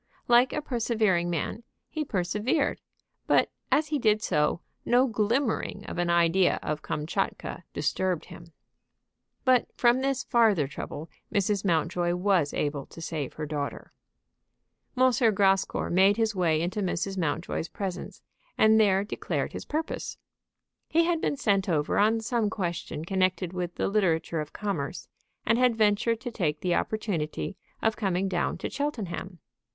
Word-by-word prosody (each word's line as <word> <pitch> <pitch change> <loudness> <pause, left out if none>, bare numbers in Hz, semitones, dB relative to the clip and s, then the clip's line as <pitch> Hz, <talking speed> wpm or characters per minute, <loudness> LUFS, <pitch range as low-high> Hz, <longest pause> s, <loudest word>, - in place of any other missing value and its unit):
Like 245 +1 +5
a 300 - -3
persevering 220 -9 +1
man, 170 +6 -2 0.3
he 310 - -3
persevered; 215 - 0 0.5
but - - +3 0.2
as 300 0 +3
he 300 -2 0
did 215 -2 +2
so, 150 -1 +1 0.2
no 245 +2 +4
glimmering 225 -2 0
of - - -5
an 175 0 +1
idea 170 +2 +3
of 150 0 -2
Kamtchatka 170 +2 -3
disturbed 180 +3 -1
him. 170 0 -12 0.9
But 255 -2 +4
from 245 +1 +4
this 270 -1 0
farther 220 -10 +3
trouble 150 +2 -7 0.2
Mrs. 200 -1 +1
Mountjoy 175 0 +1
was 180 -5 +2
able 145 -2 -2
to - - -12
save 155 -4 -4
her 155 - -4
daughter. 145 -1 -5 1.0
M. 255 0 +5 0.2
Grascour 195 -1 +2
made 190 +4 +5
his 225 -1 +1
way 170 -5 +2
into 185 +5 -2
Mrs. 190 +1 -1
Mountjoy's 165 -1 -2
presence, 190 0 -5 0.3
and 220 0 +6
there 195 -2 +4
declared 205 - -3
his - - -6
purpose. 315 +2 -3 0.7
He 335 +1 +4
had 335 -1 +1
been 285 - 0
sent 200 -7 +1
over 150 0 +1
on 220 +2 +3
some 230 -2 0
question 170 -6 -4
connected 185 -1 0
with 175 -1 -3
the - - 0
literature 170 -5 +1
of 150 - -7
commerce, 185 -7 -4 0.4
and 230 +2 +3
had 250 -2 +4
ventured 220 +1 +2
to 245 - -5
take 155 -9 -1
the 180 -1 +1
opportunity 195 -5 -2 0.3
of 225 -1 +2
coming 195 -3 0
down 180 -2 -1
to - - -4
Cheltenham. 200 - -4
195 Hz, 145 wpm, -27 LUFS, 170-225 Hz, 1.0 s, and